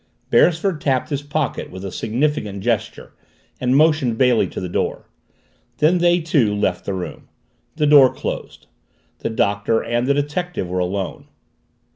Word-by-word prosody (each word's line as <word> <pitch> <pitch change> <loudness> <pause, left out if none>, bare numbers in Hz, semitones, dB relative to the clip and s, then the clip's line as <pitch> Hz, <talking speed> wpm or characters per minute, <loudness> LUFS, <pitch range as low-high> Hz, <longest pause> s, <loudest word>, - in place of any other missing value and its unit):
Beresford 170 -1 +3
tapped 130 -3 0
his 140 -1 -1
pocket 145 0 -3
with 95 +1 -8
a 95 - -5
significant 110 -5 -2
gesture - - -2 0.5
and 130 +1 +2
motioned 150 -7 +3
Bailey 125 -2 +3
to - - -7
the 90 - -4
door. 85 - -2 0.7
Then 170 +4 +3
they, 175 0 +3
too, 140 -10 +1
left 95 -3 -1
the 100 - -2
room. 90 -1 -7 0.5
The 155 - +1
door 145 -3 +7
closed. - - -6 0.5
The - - -3
Doctor 105 0 0
and 120 +2 -1
the 140 - +3
detective 145 - -2
were 90 +1 -2
alone. 95 +1 -3
130 Hz, 150 wpm, -20 LUFS, 100-150 Hz, 0.7 s, door